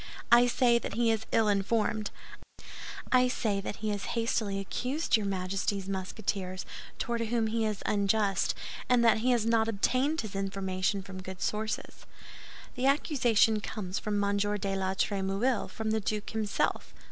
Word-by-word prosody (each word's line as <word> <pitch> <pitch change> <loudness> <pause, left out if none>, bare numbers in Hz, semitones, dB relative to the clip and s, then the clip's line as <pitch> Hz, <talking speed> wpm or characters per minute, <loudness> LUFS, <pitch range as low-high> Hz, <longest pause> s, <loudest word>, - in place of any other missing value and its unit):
I 240 +1 +7
say 240 -1 +3
that - - -5
he 230 0 +3
is 220 0 -2
ill 225 -1 +3
informed. 210 +1 +1 1.0
I 255 0 +5
say 215 -5 -1
that 200 - -5
he 215 - -3
has 205 -1 -2
hastily 220 -3 0
accused 255 - 0
your 210 -3 0
Majesty's 195 +1 -2
Musketeers, 190 -1 -3 0.3
toward 235 -1 -2
whom 230 0 0
he 225 0 0
is 210 -2 -4
unjust, 200 -1 +1 0.3
and 245 -2 +4
that 225 -1 +5
he 245 +3 +1
has 240 -3 +3
not 225 -1 +3
obtained 255 +8 +1
his 210 -3 -7
information 195 0 -1
from 185 -1 -8
good 185 0 -8
sources." 215 +3 -3 0.7
"The 255 +2 0
accusation 240 -7 +3
comes 185 0 -4
from 210 -1 -1
Monsieur 205 +1 +1
de 195 0 -2
la 190 0 -1
Trémouille, 200 +6 0
from 220 -1 -3
the 220 - +1
duke 210 +2 -3
himself. 215 -2 -1
215 Hz, 160 wpm, -30 LUFS, 195-230 Hz, 1.0 s, I